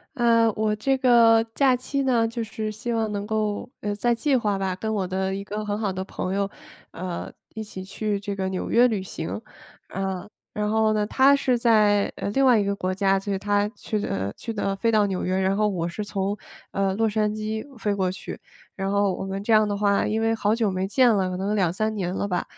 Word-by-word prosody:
呃， 230 -2 +4
我 215 -1 +1
这 270 +6 +1
个 230 -3 +6
假 270 -3 +4
期 275 +3 -2
呢， 240 -4 +2
就 230 0 -4
是 215 0 -4
希 215 +3 -5
望 220 -2 0
能 205 0 -3
够 215 -1 -1
呃， 205 0 -2
在 240 +3 +1
计 265 +4 +1
划 210 -5 0
吧， 190 -1 -1
跟 220 +4 -3
我 195 -3 -1
的 190 +1 -1
一 195 +1 -4
个 210 +1 -5
很 205 0 -2
好 210 -3 -1
的 185 0 -4
朋 190 0 -4
友， 200 0 +1 0.4
呃， 180 0 -5 0.2
一 220 - -4
起 190 -3 -8
去 205 +1 -2
这 200 0 -4
个 190 -1 -2
纽 185 -1 -3
约 240 +2 +5
旅 215 -5 -1
行。 180 +1 -5 0.5
呃， 190 0 -3 0.3
然 210 0 -1
后 220 0 +2
呢， 210 -1 +1
她 275 +5 +5
是 255 -3 +1
在， 210 -4 +3
呃， - - -3
另 270 +5 +3
外 245 -4 +6
一 - - +2
个 200 0 -1
国 185 -1 -2
家， 195 0 +2
就 200 +1 -5
是 - - 0
她 205 +1 +1
去 215 -1 -4
的 100 - -2
去 230 - -5
的 200 -2 -1
飞 230 +4 +1
到 215 -2 +4
纽 190 -2 -2
约， 185 - 0
然 190 +1 +1
后 215 - +3
我 175 -5 -1
是 190 +5 -4
从， 200 0 -2 0.4
呃， 195 -1 0
洛 225 +2 +2
杉 210 0 +1
矶 215 0 -4
飞 210 -2 0
过 190 -2 0
去。 185 - -8 0.4
然 195 0 -2
后 200 -1 +2
我 - - -5
们 195 +1 -4
这 225 - +2
样 215 -1 +5
的 205 - -1
话 200 -1 +2
因 220 - 0
为 225 0 +2
好 215 -1 +1
久 225 -4 +1
没 185 +1 -1
见 255 +5 +4
了， 190 -2 +1
可 180 - -4
能 200 +3 -1
2-3 200 +3 0
年 185 -4 -2
了 200 +2 -2
吧， 180 -3 -1
205 Hz, 255 characters per minute, -24 LUFS, 195-220 Hz, 0.5 s, 个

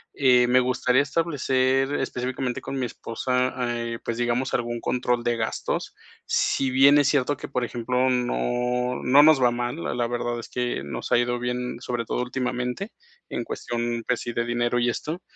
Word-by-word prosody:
Eh, 125 -3 +4
me 125 +1 +5
gustaría 130 +1 +2
establecer 135 -4 +1
específicamente 130 -2 -2
con 135 - -4
mi 125 - 0
esposa, 125 +3 -2 0.2
eh, 115 0 -4
pues, 115 -1 -3
digamos, 120 +2 0
algún 120 -1 -2
control 125 -1 0
de 120 -1 0
gastos. 110 -1 -2 0.3
Si 135 -1 +1
bien 140 +2 +6
es 145 -1 +4
cierto 145 -1 +1
que, - - -7
por 125 -3 -2
ejemplo, 125 +2 0
no 125 0 0
no 135 +3 +6
nos 155 -1 +6
va 125 -1 +5
mal, 120 +6 -3
la - - -2
la 120 -1 0
verdad 120 0 -2
es 115 - -9
que 120 - -2
nos 70 - -6
ha 120 - +5
ido 120 0 0
bien, 125 0 -3
sobre 120 -2 -3
todo 125 - -1
últimamente, 125 - -3 0.4
en - - -3
cuestión, 120 0 -3
pues 125 - +1
sí, 120 - -4
de 120 - -1
dinero 120 0 0
y 120 0 +2
esto, 155 +8 -4
125 Hz, 185 wpm, -25 LUFS, 120-130 Hz, 0.4 s, bien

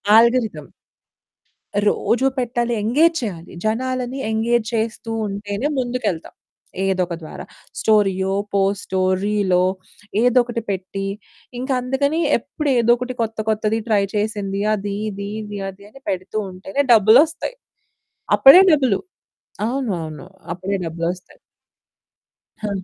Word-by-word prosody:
Algorithm. 225 - +3 1.2
రోజూ 245 +4 +1
పెట్టాలి, 240 -1 -1
engage 310 +10 +3
చేయాలి. 180 -7 -6
జనాలని 255 +3 -1
ఎంగేజ్ 225 +1 +1
చేస్తూ 225 +1 -2 0.2
ఉంటేనే 205 +5 -3
ముందుకెళ్తాం. 240 -9 -2 0.5
ఏదో 190 -1 +1
ఒక 170 - -4
ద్వారా. 155 - -8 0.4
స్టోరీయో, 195 -3 +2 0.2
పోస్టో, 195 -1 0 0.2
రీలో 200 -3 +2 0.6
ఏదో 245 +1 +3
ఒకటి 235 -1 -4
పెట్టి, 195 +1 -3 0.5
ఇంక 260 +2 -5
అందుకని 280 +5 0 0.2
ఎప్పుడు 285 +4 -4
ఏదో 235 0 +4
ఒకటి 250 +1 -4
కొత్త 225 -1 -3
కొత్తది 215 +1 +1
ట్రై 210 -3 +3
చేసింది, 205 -2 -2
అది, 200 -1 -3
ఇది, 200 0 -6
ఇది, 205 -1 -6
అది 200 +1 -13
అని 270 +5 -16
పెడుతూ 185 +3 -3
ఉంటేనే 190 +9 -2
డబ్బులొస్తాయి. 275 - +4 0.8
అప్పుడే 275 +8 +10
డబ్బులు. 260 -9 +3 0.7
అవును, 250 -2 -1
అవును. 155 +2 -8 0.3
అప్పుడే 185 +3 -2
డబ్బులొస్తాయి. 170 +2 -5 1.3
ఆ! - - -1
215 Hz, 115 wpm, -21 LUFS, 195-245 Hz, 1.3 s, అప్పుడే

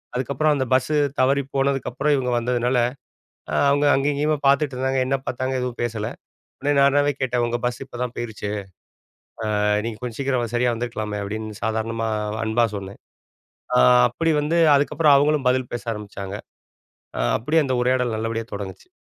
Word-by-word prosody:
அதுக்கப்பறம் 140 +4 +1
அந்த 130 -1 0
பஸ்ஸு 130 +4 +2 0.2
தவறிப் 135 +1 +2
போனதுக்கப்பறம் 135 +1 +1
இவங்க 125 -2 -1
வந்ததுனால, 125 +1 0 0.8
அ - - -1 0.2
அவுங்க 145 +1 +2
அங்க 135 +1 +1
இங்கேயுமே 150 +2 +1
பாத்துட்டு 140 0 +3
இருந்தாங்க. 130 0 0
என்ன 135 +1 +1
பாத்தாங்க 130 +1 -2
எதுவும் 125 -1 -4
பேசல. 115 -2 -2 0.5
ஒன்னே 145 +1 +1
நானாவே 145 +1 +4
கேட்டேன், 125 -2 0
"உங்க 120 0 -1
பஸ்ஸு 125 +2 -2
இப்ப 120 - -10
தான் 125 -1 -4
போயிருச்சு. 110 -3 -4 1.1
அ - - +1 0.2
நீங்க 110 -2 -5
கொஞ்சம் 120 -1 -5
சீக்கிரம், 125 -4 -1
சரியா 120 0 +2
வந்துருக்கலாமே." 110 -3 -4
அப்படீன்னு 110 +1 -6
சாதாரணமா 115 0 -1 0.4
அன்பா 115 +1 +2
சொன்னேன். 100 0 -8 0.8
அ - - +5 0.3
அப்டி 165 -1 0
வந்து 165 +3 +1 0.2
அதுக்கப்பறம், 145 0 +4
அவங்களும் 145 -2 +2
பதில் 130 -1 -1
பேச 120 - -5
ஆரம்பிச்சாங்க. 100 -1 -7 1.0
அப்டியே 160 +1 +2
அந்த 130 - 0
உரையாடல் 125 -2 +1
நல்லபடியா 115 0 -3
தொடங்குச்சு. 100 - -7
125 Hz, 150 wpm, -23 LUFS, 115-140 Hz, 1.1 s, அ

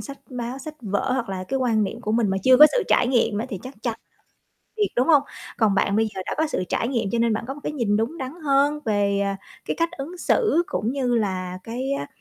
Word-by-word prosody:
sách 275 -1 -8
báo, 250 +1 -4
sách 305 +3 -8
vở, 210 +3 -1
hoặc 245 -4 -1
là 185 -1 -4
cái 270 - 0
quan 230 -4 +2
niệm 225 +4 -5
của 215 -3 -2
mình 225 -2 +2
mà 190 - 0
chưa 260 0 +7
có 300 +3 +10
sự - - +2
trải - - +4
nghiệm 235 -5 +2
á 225 - -2
thì 205 -7 -5
chắc 260 +2 -9
chắn 235 -3 -1 0.8
việc, 415 -2 +2
đúng 250 +5 +2
hông? 295 -4 +6 0.4
Còn 215 -4 +3
bạn 195 +1 +2
bây 220 0 +3
giờ - - -4
đã - - -2
có 315 - +2
sự 240 -11 -2
trải 230 - 0
nghiệm 230 -6 -1
cho 235 - +1
nên 230 -1 +2
bạn 215 - -2
có 270 - -3
một 295 - -11
cái - - -3
nhìn 230 -8 +1
đúng 235 +10 -2
đắn 260 -2 -4
hơn 285 +2 +3
về, 205 -2 +1
à, 200 0 -1 0.3
cái - - -2
cách 335 0 +1
ứng 325 +7 -6
xử, 385 -3 +2
cũng 225 +4 -2
như 255 -3 0
là 185 -4 -1
cái, 255 +4 -3
á, 145 - -2
240 Hz, 265 wpm, -23 LUFS, 210-275 Hz, 0.8 s, có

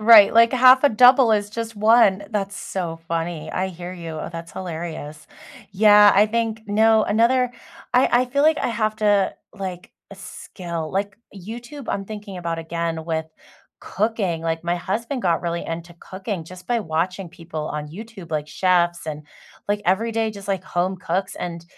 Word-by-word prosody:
Right. 215 -2 +8
Like 230 0 +5
1/2 255 +1 +6
a - - +7
double 250 0 +6
is 205 -1 0
just 230 0 -5
1. 210 -2 +4
That's 200 -2 -3
so 170 -3 -5
funny, 165 -1 -3
I 185 +1 -2
hear 180 0 -8
you 170 -2 -8
oh, 155 - -5
that's 170 -1 -8
hilarious. 160 -4 -7 0.5
Yeah, 205 0 +7
I 205 +2 +5
think 225 0 -2
no, 220 +1 +4
another 240 +4 +2 0.4
I 250 - +4
I 245 +1 +4
feel 280 +3 0
like 310 0 +4
I - - -1
have 215 -2 -1
to, 205 -2 +2 0.2
like 185 -3 -7 0.2
a - - -9
skill, 170 -4 -7
like, 200 +1 -2 0.2
YouTube, 240 +8 -9
I'm 195 - -2
thinking 205 -1 -8
about 170 -1 -3
again 165 0 -3
with 160 -1 -2 0.5
cooking, 200 -5 -1
like, 165 0 -2
my 175 +1 0
husband 225 +9 -3
got 170 -3 +1
really 170 0 -3
into 170 +1 -6
cooking 190 -2 -6
just 180 +2 -12
by 235 +1 0
watching 180 +1 -2
people 160 -2 -7
on 150 0 -5
YouTube, 195 0 -10
like, 150 -1 -2
chefs 175 0 +1
and, 150 -1 -6 0.4
like, 205 0 0
everyday 225 +4 +1
just, 200 -1 -11
like, 190 -2 -1
home 185 +1 -1
cooks, 185 +1 -3
and 170 -1 -6
190 Hz, 175 wpm, -22 LUFS, 170-220 Hz, 0.5 s, Right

